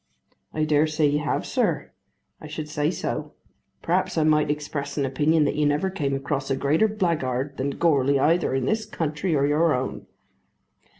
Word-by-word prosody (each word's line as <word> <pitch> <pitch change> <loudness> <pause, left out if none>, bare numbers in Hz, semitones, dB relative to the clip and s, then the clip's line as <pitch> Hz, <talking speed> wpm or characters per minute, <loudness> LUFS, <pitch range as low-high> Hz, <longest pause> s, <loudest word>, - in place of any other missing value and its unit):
"I 155 - -1
dare 155 0 +3
say 155 0 +1
you 145 0 +2
have, 150 - -1
sir. - - -1 0.5
I 155 - -8
should 155 0 -6
say 150 0 0
so. - - -4 0.5
Perhaps - - 0
I 160 - +3
might 150 -1 +3
express 145 -1 -3
an 140 - +1
opinion 150 +4 +2
that - - 0
you 150 0 +1
never 150 +6 0
came 145 -7 -1
across 135 0 -3
a 135 - +1
greater 145 +10 +2
blackguard 150 - -1
than 140 +1 -2
Goarly 140 -4 +3
either 160 -1 +2
in 130 -1 0
this 215 +6 -1
country 160 -2 -2
or 140 -1 +2
your 150 +2 +3
own." 130 +1 -4
150 Hz, 180 wpm, -24 LUFS, 140-160 Hz, 0.5 s, dare